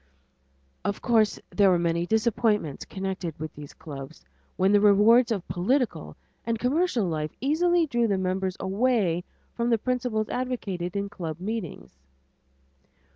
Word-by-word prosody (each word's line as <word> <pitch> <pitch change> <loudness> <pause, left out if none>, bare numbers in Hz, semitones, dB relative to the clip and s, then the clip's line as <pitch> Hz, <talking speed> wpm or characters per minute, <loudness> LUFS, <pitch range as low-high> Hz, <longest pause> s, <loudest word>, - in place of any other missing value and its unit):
Of 200 - -2
course 225 -3 +3
there 200 -2 +4
were 180 - +4
many 170 0 0
disappointments 220 - +1
connected 190 -5 -5
with 155 -1 -5
these 145 -1 -11
clubs 140 0 -9 0.3
when 190 +1 +3
the 205 0 +5
rewards 215 +4 +5
of 200 -6 -2
political 245 +8 -1 0.3
and 230 -1 -1
commercial 255 - +1
life 155 -3 -2
easily 335 +5 +2
drew 240 -5 +1
the 200 -2 +1
members 185 0 -1
away 195 -3 +1 0.3
from 235 0 -1
the 230 - +4
principles 240 -2 -1
advocated 205 -8 -3
in 200 0 -1
club 170 -5 -6
meetings. 190 - -6
205 Hz, 135 wpm, -26 LUFS, 180-235 Hz, 0.3 s, the